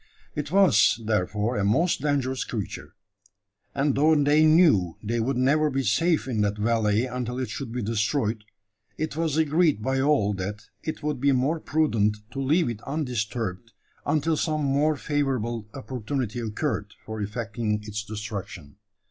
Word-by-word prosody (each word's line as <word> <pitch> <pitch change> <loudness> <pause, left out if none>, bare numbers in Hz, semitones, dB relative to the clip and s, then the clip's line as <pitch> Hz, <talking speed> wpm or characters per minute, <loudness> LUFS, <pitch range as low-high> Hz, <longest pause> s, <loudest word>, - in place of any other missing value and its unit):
It 150 -1 -4
was 175 - +5
therefore 105 +2 0
a 100 - 0
most 155 - +2
dangerous 135 -3 0
creature; 105 -5 -6 0.8
and 140 0 +2
though 155 +4 +4
they 150 +2 +4
knew 155 - +4
they 115 +3 -1
would 125 +3 0
never 150 +4 +3
be 135 -1 -1
safe 155 - +2
in 115 -5 0
that 105 0 0
valley 110 +1 +2
until 125 -1 -4
it 130 -4 -3
should 125 -1 -5
be 125 0 -3
destroyed, 110 +1 0 0.5
it 155 -1 -3
was 160 -2 0
agreed 155 - +2
by 130 +1 +1
all 135 -8 +2
that 100 +2 -5 0.2
it 155 -1 -5
would 150 -4 -2
be 140 0 +4
more 135 +6 +1
prudent 115 -11 +1
to 135 - -4
leave 155 +6 +2
it 115 -3 -4
undisturbed 115 - -3 0.3
until 155 +2 +1
some 155 -1 -1
more 145 +3 +2
favourable 125 -7 -2
opportunity 125 -2 -3
occurred 110 -2 -3
for 110 -1 -5
effecting 105 0 -2
its 105 0 -5
destruction. 100 -7 -7
125 Hz, 155 wpm, -26 LUFS, 105-150 Hz, 0.8 s, was